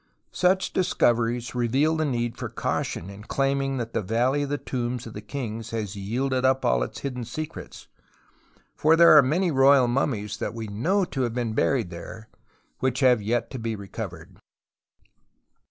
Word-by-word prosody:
Such 185 +1 +1
discoveries 120 -8 +1
reveal 130 +6 +1
the 155 0 0
need 120 -4 -1
for - - -5
caution 90 +4 -3
in 100 +1 -11
claiming 135 0 0
that 115 -2 -4
the 115 - 0
X^alley 120 +8 +1
of 145 - -2
the 145 - -1
Tombs 125 -3 -3
of 115 - -9
the 105 - -7
Kings 115 -2 -5
has 110 -3 -4
yielded 125 +6 -1
up 130 0 +2
all 60 -1 +2
its - - -4
hidden 125 -3 -4
secrets. 155 +7 -7 0.9
For 155 +2 +4
there 170 -1 +8
are 150 - +10
many 165 +7 +1
royal 135 -2 +5
mummies 120 -5 -1
that - - -4
we 115 -1 -5
know 160 - 0
to 135 -6 -4
have 120 -2 -1
been 120 -3 -1
buried 115 -5 +1
there 110 +6 -9 0.5
which 130 +1 0
have 125 -4 +5
yet 115 +3 -1
to 130 - -5
be 115 -1 -3
reco\'ered. 100 -1 -8
125 Hz, 170 wpm, -25 LUFS, 115-140 Hz, 0.9 s, are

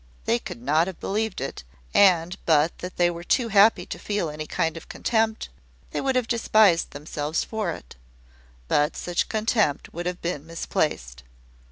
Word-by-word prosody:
They 120 - +2
could 120 - -9
not 155 +6 +3
have 190 - -7
believed 215 0 -2
it, 135 - -5 0.3
and, 180 -2 +4
but 160 0 +3
that 180 +1 -7
they 175 0 +3
were 170 0 -7
too 235 +6 +1
happy 210 +2 +5
to - - -7
feel 205 -7 -2
any 155 0 -6
kind 165 -1 -1
of 165 - -10
contempt, 220 -1 0 0.4
they - - -2
would 265 -1 0
have 250 -2 +1
despised 215 -6 +3
themselves 150 +1 -3
for 215 -5 -3
it. - - -8 0.7
But 150 - +1
such 175 -1 -1
contempt 215 - 0
would 175 +1 -4
have 180 0 -3
been 170 -4 -3
misplaced. 60 - -2
175 Hz, 170 wpm, -25 LUFS, 155-215 Hz, 0.7 s, happy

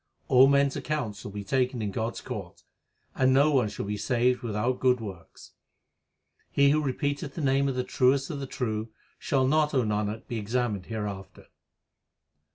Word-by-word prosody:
All 130 +1 +7
men 140 0 +4
s 140 - -3
accounts 125 -10 -3
shall 105 - -7
be 100 0 -6
taken 125 +4 0
in 105 -2 -2
God 115 +3 -2
s - - -8
court; 100 -9 -7 0.5
And 130 0 +3
no 140 +3 +4
one 130 -7 +2
shall - - -5
be 105 +1 -3
saved 125 +3 +1
without 120 +2 -1
good 125 -1 +3
works. 95 -6 -10 1.0
He 140 0 +4
who 155 +1 +2
repeateth 145 +1 -2
the - - -5
name 140 0 +2
of 135 - -3
the 125 - 0
Truest 135 +3 +2
of 145 - -5
the 135 - -5
true, 110 -4 -3 0.3
Shall 135 -2 +1
not, 150 +2 +2
O 130 - +3
Nanak, 105 0 -2
be 115 - -3
examined 110 -3 -2
hereafter. 100 -4 -6
125 Hz, 180 wpm, -27 LUFS, 105-135 Hz, 1.0 s, All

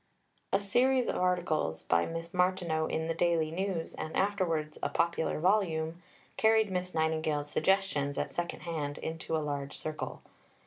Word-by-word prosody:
A - - +4
series 245 +5 +3
of - - 0
articles 175 - 0
by 85 0 +2
Miss 165 +1 -5
Martineau 180 -3 +1
in 160 0 -1
The 165 - 0
Daily 165 -2 +2
News, 180 -1 -2
and 155 - -5
afterwards 170 -6 0
a - - 0
popular 170 -2 0
volume, 170 -3 +1 0.4
carried 220 -2 +4
Miss 180 0 -2
Nightingale's 155 -2 0
suggestions, 155 -6 +1
at - - -2
second 175 0 -3
hand, 150 -4 -3
into 160 0 -3
a 155 - -2
large 140 -1 -3
circle. 155 0 -5
165 Hz, 150 wpm, -31 LUFS, 155-185 Hz, 0.4 s, A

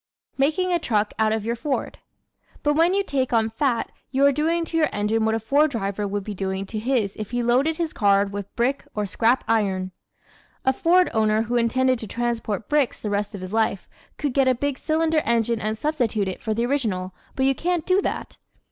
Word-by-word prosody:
Making 315 +7 +1
a 345 - +2
Truck 215 -8 0
out 220 0 +3
of 220 -1 -1
Your 235 +1 -1
Ford 275 +3 -3 0.6
¶ - - -32
But 295 - +3
when 335 +5 +3
you 400 - +2
take 270 -7 -1
on 225 -1 +2
fat 245 -1 0 0.2
you 270 +1 +2
are 280 - +6
doing 325 +4 0
to 330 - -7
your 315 -2 +3
engine 215 +2 0
what 220 0 +2
a - - 0
Ford 285 +8 +3
driver 205 -4 -2
would 200 0 -3
be 210 - -5
doing 190 0 -3
to 215 +2 -5
his 225 -4 0
if 215 -2 -5
he 245 0 -1
loaded 265 +7 +2
his 330 -2 -2
car 200 -2 +3
with 200 0 -7
brick 255 +4 0
or 210 -1 -1
scrap 230 +5 +2
iron. 195 -4 0 0.7
A 265 - +4
Ford 355 +6 +3
owner 220 0 +2
who 240 +2 -3
intended 255 +2 +2
to 220 - -6
transport 230 -2 -2
bricks 295 -4 +1
the 210 - -4
rest 205 +1 -1
of 195 - -7
his 185 +2 -7
life 220 -3 0 0.3
could 290 -4 -2
get 270 -1 +3
a 255 - +4
big 280 +2 -2
cylinder 315 0 +1
engine 230 -1 +1
and 215 +1 -2
substitute 235 -8 0
it 185 - -5
for 220 -2 -2
the 235 +2 0
original 210 -9 -1 0.2
but 265 - +1
you 270 - +4
can't 345 +2 -1
do 375 +2 +3
that. - - -4
235 Hz, 220 wpm, -23 LUFS, 210-285 Hz, 0.7 s, are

